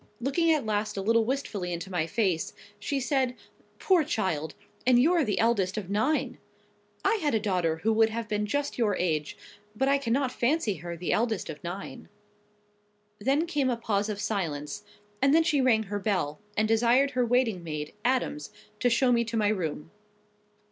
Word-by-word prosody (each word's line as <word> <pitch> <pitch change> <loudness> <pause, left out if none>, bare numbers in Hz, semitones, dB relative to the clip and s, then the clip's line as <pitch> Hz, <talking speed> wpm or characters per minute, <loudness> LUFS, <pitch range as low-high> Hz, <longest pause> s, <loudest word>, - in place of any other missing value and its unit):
Looking 305 +7 +2
at 300 -6 +1
last 210 -1 -1
a - - -1
little 230 +2 +3
wistfully 215 -8 -3
into 175 +3 -5
my 170 -3 0
face, 185 -6 0 0.3
she 280 - -2
said—"Poor 270 +6 -1
child! 160 - -2 0.3
And 250 -1 +5
you're 330 +5 +4
the 210 -6 -1
eldest 210 -4 +1
of 200 -3 -4
nine! 225 +10 0 0.7
I 425 +3 +3
had 295 -6 +1
a - - +3
daughter 180 -6 0
who 225 - +3
would 225 0 +4
have 230 0 -4
been 210 0 -1
just 285 +3 -2
your 210 -4 +2
age; 155 -5 -1 0.4
but 265 +5 +1
I 280 0 +3
cannot 260 +1 0
fancy 240 - 0
her 170 +2 -6
the 175 - -1
eldest 220 -7 0
of 150 - -11
nine." 175 +3 -7 1.1
Then 275 +9 +1
came 295 -6 0
a 240 - 0
pause 210 -2 -1
of 205 -1 -3
silence; 190 -4 -3 0.4
and 275 +2 +4
then 330 - +5
she 305 -4 +2
rang 230 -4 +3
her 205 0 -4
bell, 185 -8 -1 0.2
and 215 +1 +3
desired 240 +5 +3
her 250 -1 +1
waiting 235 -6 +1
maid, 150 -2 -5
Adams, 245 - 0 0.3
to 245 - +3
show 245 +2 +3
me 235 -1 +3
to 230 0 -3
my 210 -2 +2
room. 165 -6 -3
220 Hz, 180 wpm, -28 LUFS, 190-260 Hz, 1.1 s, And